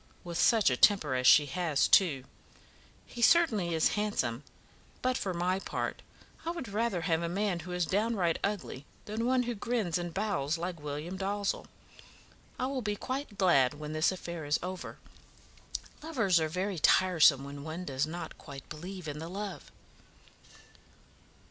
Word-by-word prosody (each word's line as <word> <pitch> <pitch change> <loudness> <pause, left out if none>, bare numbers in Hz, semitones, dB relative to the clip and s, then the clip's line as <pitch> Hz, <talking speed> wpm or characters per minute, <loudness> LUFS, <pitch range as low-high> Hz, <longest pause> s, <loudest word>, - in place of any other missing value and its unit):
with 175 -1 -6
such 220 - +4
a - - +2
temper 155 -2 +4
as 125 0 +2
she 150 - +8
has, 150 0 +1
too. 150 -9 +4 0.8
He 240 - -9
certainly 220 - +4
is 160 - +3
handsome; 205 - -1 0.6
but 255 0 +2
for 195 - -2
my 180 +2 0
part, - - -4 0.4
I 325 - -3
would 335 -7 -4
rather 210 -3 -1
have 160 0 +1
a 170 - -2
man 195 0 -1
who 175 +2 -8
is 180 -1 0
downright 200 -3 0
ugly 195 -9 -3 0.2
than 220 +3 -2
one 255 0 +3
who 240 0 -2
grins 210 -6 -1
and 175 -1 -4
bows 175 -6 -1
like 170 -1 -5
William 150 +5 -5
Dalzell. 200 +1 -2 0.9
I - - -1
will 265 0 -2
be 210 -2 -2
quite 260 -1 -5
glad 145 -9 +4
when 150 +1 -6
this 155 +3 +2
affair 170 -3 -6
is 145 +1 +1
over. 185 0 -6 1.0
Lovers 225 - +2
are 160 -1 0
very 185 +2 -2
tiresome 160 -7 +5
when 140 0 -8
one 160 +4 -5
does 135 0 -1
not 170 +2 -7
quite 140 -3 -10
believe 180 +2 -7
in 150 0 -5
the 165 +1 -6
love." 200 +2 -6
180 Hz, 160 wpm, -30 LUFS, 155-210 Hz, 1.0 s, she